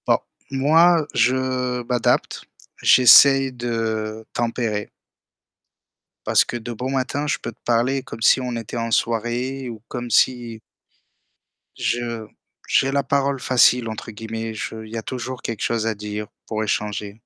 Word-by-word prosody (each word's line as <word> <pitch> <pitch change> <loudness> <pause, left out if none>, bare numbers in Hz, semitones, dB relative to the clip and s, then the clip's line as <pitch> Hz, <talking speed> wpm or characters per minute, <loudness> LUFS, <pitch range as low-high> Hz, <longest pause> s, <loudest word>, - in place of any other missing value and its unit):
Bon, - - +4 0.3
moi, 160 +4 +4
je 125 0 0
m'adapte. 120 0 0 0.4
J'essaye 135 +1 +7
de 110 -2 -3
tempérer 115 -3 -2 1.4
parce - - +4
que, 120 - -5
de 120 +1 -6
bon 125 +4 -4
matin, 135 +2 -1
je 145 - 0
peux - - -6
te - - -29
parler, 125 +3 +1
comme 130 -4 -10
si 130 - +5
on 125 -1 -3
était 115 +1 -6
en 115 0 -2
soirée, 120 +4 -1
ou 110 -3 -8
comme 120 -1 -5
si 120 -3 +1 1.2
je 115 -2 -2 0.4
j'ai 135 +1 +2
la 140 0 +1
parole 140 0 0
facile, 125 -2 +3
entre 110 +1 -6
guillemets, 115 +1 -6
je 110 +1 -6
il 110 - -13
y - - -5
a 110 - -3
toujours 130 +1 -6
quelque 115 -3 -4
chose 115 -1 -1
à 110 - -1
dire, 105 0 -5 0.2
pour 110 -1 -3
échanger. 105 0 -3
120 Hz, 150 wpm, -22 LUFS, 110-130 Hz, 1.4 s, J'essaye